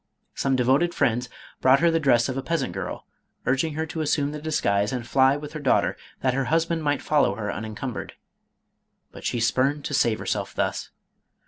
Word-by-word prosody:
Some 135 -1 0
de 125 - +2
voted 145 +8 +2
friends 125 -3 +1 0.3
brought 130 +1 +5
her 170 0 +4
the 165 - +2
dress 120 -6 +3
of 130 - -3
a 135 - -2
peasant 160 - -2
girl, 95 0 -5 0.4
urging 145 +4 +1
her 160 +1 -1
to 160 0 -4
assume 145 -1 +1
the 150 0 -6
disguise 105 -10 +1
and 125 -2 -3
fly 135 +2 +4
with 145 0 -8
her 155 - -5
daughter, 135 -4 +2 0.3
that 130 -1 +2
her 135 0 0
husband 165 +2 +1
might 145 -1 0
follow 150 -1 +2
her 105 -2 -3
unencum 110 +3 -5
bered. - - -6 1.0
But - - -11
she 120 - 0
spurned 135 +5 +1
to - - -3
save 115 -5 +2
herself - - -3
thus. - - -2
135 Hz, 200 wpm, -25 LUFS, 125-150 Hz, 1.0 s, brought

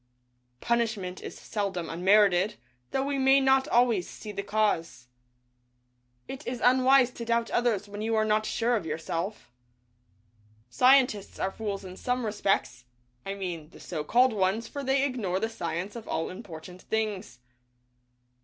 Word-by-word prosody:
Punishment 220 -6 -1
is - - -8
seldom 195 -5 -3
unmerited, 195 +2 +3 0.3
though 270 - -1
we 280 -1 -1
may 270 +1 +5
not 265 0 +3
always 235 - +2
see 215 - -8
the 200 -1 -4
cause. 200 - -1 1.2
It 270 +3 -8
is 245 -1 -3
unwise 255 +1 +5
to 235 - -7
doubt 235 0 0
others 225 -4 +1
when 205 +1 -7
you 225 +1 0
are 215 0 +2
not 215 0 +1
sure 240 +1 +1
of 200 -8 -3
yourself. 165 - -4 1.2
Scientists 250 - +3
are 190 - -1
fools 200 -2 -5
in 185 0 -9
some 250 -1 -1
respects, 195 - -1 0.4
I 195 - -3
mean 175 -6 -5
the - - -16
so 155 -4 -5
called 245 +9 +4
ones, 200 +3 0
for 285 -1 -6
they 270 +1 +2
ignore 220 -9 -1
the 225 +2 -1
science 175 -1 -4
of 230 -2 -8
all 160 - -2
important 180 -2 -10
things. 210 - -3
215 Hz, 150 wpm, -28 LUFS, 185-240 Hz, 1.2 s, may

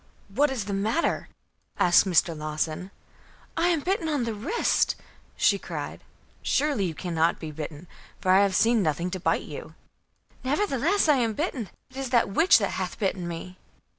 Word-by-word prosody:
"What 280 +9 +2
is 250 -7 -3
the 205 - -3
matter?" 215 +12 0 0.5
asked 175 +2 +5
Mr. 170 -2 +3
Lawson. 155 +3 -3 0.7
"I 335 +1 +2
am 335 -4 +2
bitten 360 -1 -1
on 290 -5 0
the 230 -1 -2
wrist," 300 - +1 0.4
she - - +3
cried. - - -6 0.4
"Surely 280 -9 +1
you 165 -3 -3
cannot 165 -1 0
be 160 -2 -6
bitten, 150 +1 -7 0.3
for 185 - +1
I 190 - +7
have 200 -2 +2
seen 230 +2 +4
nothing 170 +1 -1
to 185 - -3
bite - - +1
you." - - -9 0.7
"Nevertheless, 310 - +1
I 295 -2 +5
am 230 -3 +1
bitten. 270 - -2 0.2
It - - -12
is 270 -2 -4
a 235 - +5
witch 320 - +5
that 200 -4 0
hath 180 - -4
bitten 190 -3 -1
me." 175 +2 -7
205 Hz, 170 wpm, -26 LUFS, 175-275 Hz, 0.7 s, I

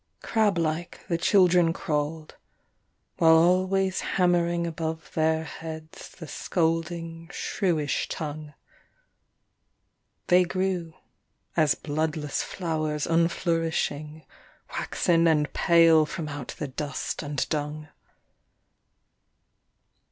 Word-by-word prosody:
Crab 215 -5 +2
like 165 +1 -2
the 170 - +1
children 180 -3 +4
crawled, 155 0 -3 0.8
while 160 -1 +6
always 185 +3 +3
hammering 175 -1 +1
above 160 -1 -4
their 160 0 +1
heads 160 +1 -8
the 165 - -11
scolding 165 0 -2
shrewish 160 -8 -1
tongue; 150 -1 -6 1.7
They 180 0 +5
grew 180 -2 -2 0.6
as 155 -3 +3
bloodless 155 -1 -2
flowers 155 -4 -2
unflourishing, 165 -2 0 0.5
waxen 170 -1 +1
and 150 -2 +2
pale 165 -3 +5
from 155 0 -5
out 145 -3 -6
the 150 - -3
dust 145 +2 -4
and 145 -2 -2
dung. 150 0 -3
165 Hz, 90 wpm, -26 LUFS, 155-170 Hz, 1.7 s, while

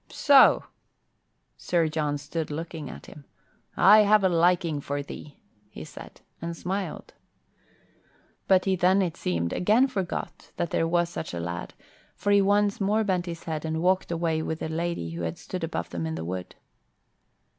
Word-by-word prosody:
"So!" 280 -3 +6 0.9
Sir 170 -2 +1
John 150 -2 -1
stood 155 +2 -4
looking 160 -1 -6
at - - -10
him. 145 - -13 0.5
"I 205 +4 +8
have 210 0 +5
a 190 - +4
liking 170 -3 +2
for 145 +1 -3
thee," 145 +1 -10 0.3
he 80 - -9
said, - - -12 0.2
and 170 0 -5
smiled. 190 +3 -4 1.3
But 185 -1 +4
he 190 -1 +2
then, 185 +2 +3
it 170 -3 -3
seemed, 85 -1 -2
again 215 +8 +3
forgot 195 -9 -5
that 170 - -2
there 165 - +1
was 175 0 +1
such 160 - -6
a - - -3
lad, 85 0 -5 0.4
for 205 - -1
he 200 0 +6
once 205 +1 +2
more 210 +3 +2
bent 185 -3 -1
his 170 -1 -6
head 155 -2 -4
and 160 0 -2
walked 185 0 +1
away 165 -1 0
with 160 0 -3
the 160 - -5
lady 165 - -3
who 85 +1 -6
had 80 0 -3
stood 180 -2 -6
above 155 - -4
them 85 -2 -3
in 80 - -3
the 80 0 -5
wood. 90 +1 -5
170 Hz, 175 wpm, -26 LUFS, 145-190 Hz, 1.3 s, I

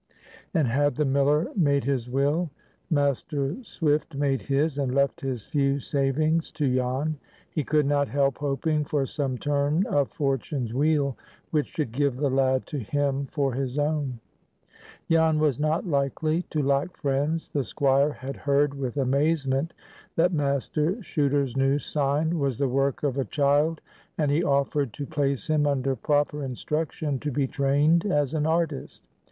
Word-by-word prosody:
And 160 -7 +2
had 145 +5 +1
the 150 - +1
miller 140 +3 +2
made 140 -7 +2
his 130 -3 -1
will? 145 +6 +1 0.4
Master 145 - 0
Swift 150 -7 -1
made 140 -1 0
his, 145 +1 0
and 130 -2 -1
left 140 +4 +1
his 130 -6 -3
few 140 -1 +1
savings 150 +4 0
to 140 -5 0
Jan. 130 +4 -1 0.3
He 155 - -1
could 150 +1 +2
not 145 0 +2
help 140 -1 +1
hoping 145 +2 0
for 145 -1 0
some 135 -2 -2
turn 145 +6 +1
of 140 -2 +1
Fortune's 135 -3 -2
wheel 145 -1 +1 0.3
which 150 -2 +1
should 150 -8 -3
give 140 +1 0
the 140 -1 0
lad 130 -1 +2
to 150 - -4
him 140 +3 -1
for 140 -3 -1
his 130 +1 -3
own. 145 -4 -1 0.9
Jan 160 -1 +3
was 150 -4 +1
not 155 +4 0
likely 155 +1 0
to 150 -2 -1
lack 140 +5 0
friends. 145 +3 -1
The 140 - -1
Squire 140 +3 +2
had 135 0 -7
heard 140 0 +2
with 135 -2 -4
amazement 140 +2 +1 0.4
that 175 +2 +3
Master 145 +2 0
Chuter's 140 -6 0
new 135 +1 +2
sign 150 +4 0
was 135 -4 0
the 140 - +1
work 135 +2 0
of 140 -2 0
a 135 - 0
child, 145 +5 +1 0.4
and 150 -3 +1
he 155 +4 +2
offered 140 -4 +1
to 145 - -5
place 140 -2 -1
him 155 -2 +2
under 135 -1 0
proper 145 +1 0
instruction 145 +2 -2
to 150 - -3
be 140 0 0
trained 145 +7 +2
as 145 -6 +1
an 155 -1 0
artist. 160 -3 -1
145 Hz, 160 wpm, -26 LUFS, 135-150 Hz, 0.9 s, Jan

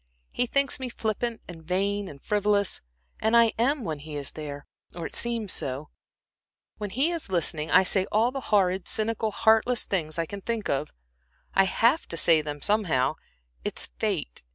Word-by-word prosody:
He 245 - 0
thinks 275 +1 +1
me 260 -1 -4
flippant, 230 0 -2
and 170 -2 -9
vain, 200 +4 -1
and 140 -5 -10
frivolous, 205 +2 +1 0.4
and 220 +2 +3
I 230 -1 +5
am 270 +3 +2
when 155 -6 -3
he 150 +1 -8
is 140 -2 -2
there, 145 -2 -7 0.3
or 170 -2 -5
I - - -3
seem 235 -3 -1
so. 140 -4 -2 0.9
When 210 -1 -3
he 270 - +1
is 335 - -4
listening, 165 -3 0
I - - +6
say 190 +1 +1
all 225 +4 +3
the 270 - -4
horrid, 190 -3 +2
cynical, 220 0 0
heartless 225 +3 +3
things 155 -5 -2
I 165 - 0
can 200 +4 -7
think 230 0 -2
of. 140 +2 0 0.6
I 195 - +5
have 235 +10 +2
to 165 - -2
say 165 -1 +5
them, 145 -1 -6
somehow. 180 -12 +2 0.5
It - - -3
is - - +1
fate. - - -1
200 Hz, 180 wpm, -27 LUFS, 160-230 Hz, 0.9 s, I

